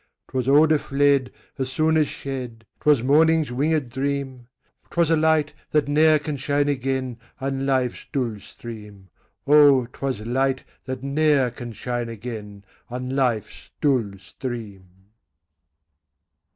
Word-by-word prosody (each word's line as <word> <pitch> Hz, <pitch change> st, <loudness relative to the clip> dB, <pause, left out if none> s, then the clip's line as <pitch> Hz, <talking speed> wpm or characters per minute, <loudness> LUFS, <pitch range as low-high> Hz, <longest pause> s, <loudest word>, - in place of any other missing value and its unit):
'Twas 130 Hz, -1 st, -2 dB
odor 150 Hz, +2 st, +5 dB
fled 140 Hz, -2 st, +2 dB, 0.3 s
As 130 Hz, -1 st, -2 dB
soon 160 Hz, +2 st, +2 dB
as 155 Hz, -2 st, +3 dB
shed; 125 Hz, -6 st, -6 dB
'Twas 145 Hz, -6 st, +3 dB
morning's 155 Hz, +2 st, +4 dB
winged 145 Hz, 0 st, 0 dB
dream; 135 Hz, -1 st, -3 dB, 0.4 s
'Twas 170 Hz, -2 st, +1 dB
a -, -, +5 dB
light, 155 Hz, -1 st, +2 dB, 0.2 s
that 150 Hz, -2 st, +1 dB
ne'er 155 Hz, +2 st, +5 dB
can 150 Hz, -1 st, -4 dB
shine 145 Hz, +2 st, 0 dB
again 130 Hz, -3 st, -2 dB, 0.2 s
On 135 Hz, 0 st, -2 dB
life's 130 Hz, -2 st, 0 dB
dull 120 Hz, -6 st, -2 dB
stream: 105 Hz, -3 st, -11 dB, 0.4 s
Oh! 145 Hz, -3 st, +6 dB
'twas 130 Hz, -2 st, -4 dB
light 130 Hz, +4 st, 0 dB, 0.2 s
that 130 Hz, 0 st, -5 dB
ne'er 140 Hz, -2 st, +2 dB
can 120 Hz, 0 st, -8 dB
shine 120 Hz, +1 st, -4 dB
again 105 Hz, -3 st, -8 dB, 0.2 s
On 125 Hz, +2 st, -4 dB
life's 120 Hz, -6 st, -1 dB
dull 125 Hz, -9 st, +1 dB
stream. 105 Hz, -1 st, -7 dB
135 Hz, 125 wpm, -23 LUFS, 120-145 Hz, 0.4 s, Oh